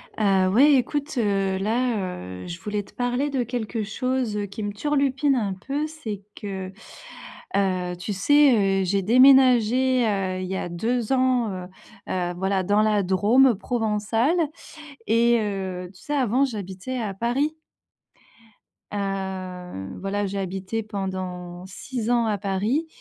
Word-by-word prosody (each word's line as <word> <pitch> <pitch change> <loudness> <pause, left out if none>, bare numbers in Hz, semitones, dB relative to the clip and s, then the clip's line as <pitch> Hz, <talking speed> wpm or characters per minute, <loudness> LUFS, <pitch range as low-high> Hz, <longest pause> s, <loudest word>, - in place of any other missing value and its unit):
Ah, 195 -3 +3
ouais, 280 +9 +6
écoute, 290 +4 -1
heu, 195 -4 +1
là, 230 +3 0 0.5
heu, - - -8
je 170 +1 -6
voulais 210 -1 -2
te - - -20
parler 245 +3 -1
de 265 -3 0
quelque 230 -2 -3
chose, 250 +1 -2
heu, 205 - -1
qui 200 +2 -7
me 205 - -2
turlupine 275 +3 +1
un 210 -6 -1
peu, 275 +10 -3
c'est 235 -11 -6 0.2
que, 190 -2 -5 0.9
heu, 185 -2 0
tu 195 +4 -4
sais, 205 -4 +4
heu, - - 0
j'ai 195 +2 +1
déménagé, 255 +1 +5
heu, 190 -3 -1
il 185 - -4
y 190 - -3
a 175 - -4
2 225 +7 -1
ans, 255 -3 +2
heu 185 -1 -6 0.4
heu, 175 -1 -1
voilà 190 0 0
dans 205 +3 +3
la 210 -2 +2
Drôme 215 +8 +4
provençale 225 - 0 0.7
et 235 +1 +4
heu, 190 -3 -4
tu 185 - -18
sais 295 - -3
avant 255 -1 +2
j'habitais 205 0 -5
à 210 -4 -3
Paris. 250 +9 0 1.4
Heu, 185 - -4
voilà, 200 +1 -2
j'ai 195 +1 -3
habité 190 +3 -3
pendant 185 -3 -5
6 225 +4 -5
ans 240 -1 +3
à 215 -2 0
Paris 205 - -1
210 Hz, 150 wpm, -24 LUFS, 190-250 Hz, 1.4 s, ouais